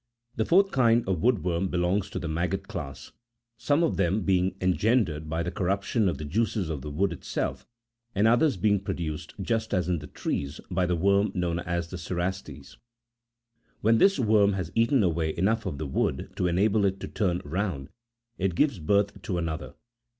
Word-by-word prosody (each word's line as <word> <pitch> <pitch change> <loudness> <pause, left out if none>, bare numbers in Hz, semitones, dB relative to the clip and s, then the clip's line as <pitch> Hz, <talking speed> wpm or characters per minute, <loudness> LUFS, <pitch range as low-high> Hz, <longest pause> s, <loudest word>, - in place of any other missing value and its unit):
The 110 - 0
fourth 195 +6 +4
kind 120 -3 +3
of 90 -4 0
wood 115 -7 +2
worm 90 +1 0
belongs 90 +2 0
to - - -5
the 85 - -4
maggot 85 +2 -2
class; 70 -2 -7 0.4
some 145 +8 +1
of 100 - 0
them 100 +2 +1
being 95 -1 +1
engendered 90 -5 +1
by 80 +1 -1
the 90 - -3
corruption 100 +3 0
of - - -3
the 75 - -6
juices 100 +1 -1
of 75 -4 -4
the 75 - -6
wood 85 +5 0
itself, 80 - -4 0.5
and 100 +3 +4
others 120 +2 +3
being 105 +2 +2
produced, 80 -5 -5
just 110 +1 -1
as 90 -3 0
in 90 -2 0
the 75 - -9
trees, 70 +2 -4
by 90 0 +1
the 90 - +1
worm 100 +4 +2
known 85 -2 -1
as 85 -1 -3
the 90 - -6
cerastes.40 90 +2 -5 1.0
"When 110 +1 +4
this 195 0 +5
worm 105 -5 +4
has 90 -4 -3
eaten 115 +2 +3
away 80 -3 0
enough 110 +6 +1
of 70 - -4
the 80 - -4
wood 70 - -1
to 90 - 0
enable 100 +4 +2
it 95 0 0
to - - -4
turn 90 -4 0
round, 80 -3 -3 0.5
it 95 -2 0
gives 135 - +2
birth 100 +5 +1
to 90 - -3
another. 80 -2 -4
95 Hz, 185 wpm, -27 LUFS, 85-105 Hz, 1.0 s, this